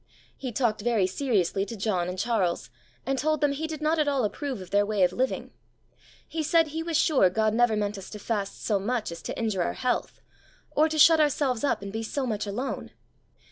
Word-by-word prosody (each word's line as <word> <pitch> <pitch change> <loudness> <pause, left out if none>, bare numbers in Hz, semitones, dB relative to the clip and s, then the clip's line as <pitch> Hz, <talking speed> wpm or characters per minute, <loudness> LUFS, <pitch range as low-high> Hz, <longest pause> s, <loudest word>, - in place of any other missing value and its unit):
He 260 -3 -5
talked 225 -3 0
very 225 -4 +2
seriously 195 -3 0
to 215 +3 -6
John 190 -4 0
and 180 - -5
Charles, 200 -4 0 0.3
and 270 -1 0
told 310 0 +1
them 290 -1 +2
he 305 +3 -3
did 310 -1 -6
not 315 +1 +2
at 300 - +2
all 275 -3 +1
approve 265 +2 -3
of 185 - -10
their 205 0 +4
way 205 -2 +1
of 180 0 +3
living. 260 +1 -2 0.8
He 325 - -3
said 325 +1 +3
he 320 +2 -3
was 330 -1 0
sure 280 - +4
God 215 +3 +1
never 240 -1 +3
meant 205 -1 -2
us 190 - -10
to 210 - -7
fast 205 -2 -3
so 205 -3 +2
much 220 0 -2
as 170 - -8
to - - -5
injure 215 -5 -1
our - - 0
health, 250 -1 -2 0.5
or 310 +2 +3
to 315 - -2
shut 320 +1 +7
ourselves 285 -5 +1
up 280 -7 0
and 200 0 -7
be 220 - -2
so 260 +5 -2
much 215 -3 -2
alone. 240 +7 -4
230 Hz, 220 wpm, -27 LUFS, 200-285 Hz, 0.8 s, shut